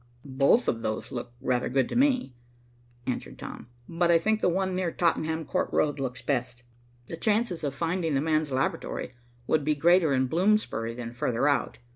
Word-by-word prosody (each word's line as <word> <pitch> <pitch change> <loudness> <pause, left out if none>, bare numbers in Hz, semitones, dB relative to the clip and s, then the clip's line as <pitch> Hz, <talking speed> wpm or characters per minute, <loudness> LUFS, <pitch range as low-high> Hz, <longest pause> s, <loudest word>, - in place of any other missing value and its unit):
"Both 140 - +3
of 115 - 0
those 110 -1 -3
look 120 -1 -5
rather 125 -2 0
good 130 -1 +2
to - - -4
me," 255 - +2 0.7
answered 125 -1 -4
Tom. - - -8 0.2
"But 170 +1 0
I 170 - +6
think 215 +6 0
the - - +3
one 190 +1 0
near 180 -2 -1
Tottenham 160 -2 0
Court - - -1
Road 145 -1 +1
looks 130 -1 -4
best. 125 -3 -2 0.4
The - - -5
chances 210 -3 0
of 140 -2 -2
finding 165 0 -1
the - - +3
man's 155 -1 0
laboratory 130 -1 -2 0.3
would 155 +2 +1
be 150 +1 +1
greater 170 +1 +4
in 130 -1 +2
Bloomsbury 165 - +1
than 120 -1 -6
farther 120 +2 0
out." 145 - 0
150 Hz, 180 wpm, -27 LUFS, 130-175 Hz, 0.7 s, I